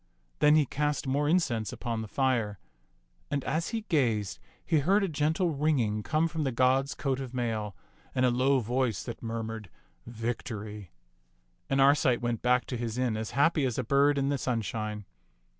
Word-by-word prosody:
Then 150 0 +6
he 155 -2 +4
cast 145 +2 -1
more 145 +2 +1
incense 125 - +1
upon 115 -2 -3
the 110 - -6
fire. 115 -5 0 0.7
And 140 -2 -1
as 165 +1 -1
he 225 - -2
gazed, 120 - 0 0.3
he 160 - +3
heard 195 +8 +3
a - - +1
gentle 160 +2 0
ringing 135 -8 +1
come 155 +8 +1
from 160 -1 -3
the 135 - 0
god's 130 +3 +2
coat 135 -2 -1
of 130 -2 -6
mail, 110 -5 -2 0.4
and 130 - +3
a 125 - +3
low 130 +2 +2
voice 120 -3 -1
that 120 - -7
murmured, 115 -3 -5 0.4
"Victory"; 110 -4 -5 0.8
and 135 - +1
Arcite 135 -2 +4
went 120 -2 -2
back 125 0 +2
to 125 - -4
his 115 -1 -4
inn 125 -3 0
as 110 0 -3
happy 150 +1 +3
as 125 -4 -1
a 130 - 0
bird 140 +4 +3
in 140 0 +1
the 140 -1 0
sunshine. 110 -4 -3
130 Hz, 175 wpm, -29 LUFS, 115-145 Hz, 0.8 s, Then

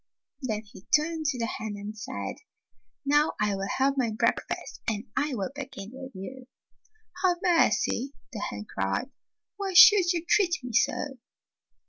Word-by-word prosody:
Then 220 -5 -2
he 205 -3 -14 0.2
turned 315 0 -3
to 275 -3 0
the 230 - -1
hen 220 -2 -4
and 205 +1 -7
said, 215 - -5 0.4
" - - -47
Now 295 +2 +3
I 210 -1 +1
will 195 0 -3
have 275 +1 +2
my 240 -3 +2
breakfast, 215 +1 -1
and 215 -3 -1
I 290 -2 0
will 200 +1 -3
begin 245 -8 -7
with 265 0 -9
you.'" 250 +7 -8 0.8
''Have 360 -2 +4
mercy!" 275 -5 +2 0.2
the 215 - -4
hen 105 - -4
cried. 95 - -2 0.5
"Why 395 -2 -3
should 370 -1 +9
you 340 -2 -2
treat 355 -2 +3
me 250 -2 -6
so?" 265 +3 +1
260 Hz, 160 wpm, -28 LUFS, 210-300 Hz, 0.8 s, should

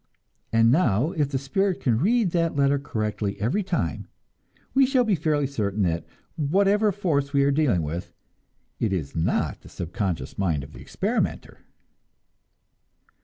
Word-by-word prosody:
And 115 +1 +4
now, 145 - +2
if 150 -7 0
the 135 - -1
spirit 185 +8 0
can 115 -4 +1
read 215 - +2
that 165 -2 0
letter 140 0 +3
correctly 110 -6 -3
every 125 - 0
time, 180 -3 -2 0.7
we 270 - +5
shall 260 -2 +3
be 220 -3 +1
fairly 150 -3 +1
certain 105 -6 -1
that 85 -2 -1 0.3
whatever 200 +7 +3
force 150 -8 -1
we 140 -1 +4
are 140 - +3
dealing 135 - +2
with, 80 +4 -5 0.7
it 110 -4 0
is 75 -7 -3
not 80 - 0
the - - -14
subconscious 90 +1 -4
mind 80 -8 0
of 75 +2 -12
the - - -11
experimenter. - - -2
140 Hz, 150 wpm, -25 LUFS, -, 0.7 s, we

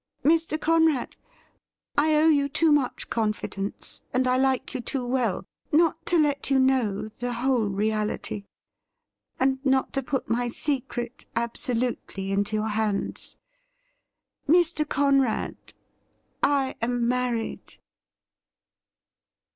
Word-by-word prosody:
Mr. 320 0 +2
Conrad, 320 -5 +2 0.8
I 305 +1 +3
owe 305 +1 +4
you 285 -3 +3
too 310 +2 +3
much 290 -4 +1
confidence, 210 -3 -3
and 255 +1 +1
I 255 0 +3
like 265 0 +1
you 260 - -3
too 255 +1 -2
well, 245 -7 0 0.3
not 325 +1 +3
to 350 - +3
let 290 -3 +1
you 270 - +4
know 250 -6 +1
the 245 0 -2
whole 240 -2 +1
reality, 210 0 -2 0.9
and 265 +1 +1
not 265 -1 +1
to 275 - 0
put 265 0 -3
my 240 +1 0
secret 245 -2 -2
absolutely 235 -4 -1
into 200 +2 0
your 215 +1 0
hands. 210 -1 -2 1.1
Mr. 325 -2 +3
Conrad, 275 -4 0 0.7
I 275 -2 +2
am 240 0 0
married 245 -2 -2
255 Hz, 115 wpm, -26 LUFS, 230-285 Hz, 1.1 s, owe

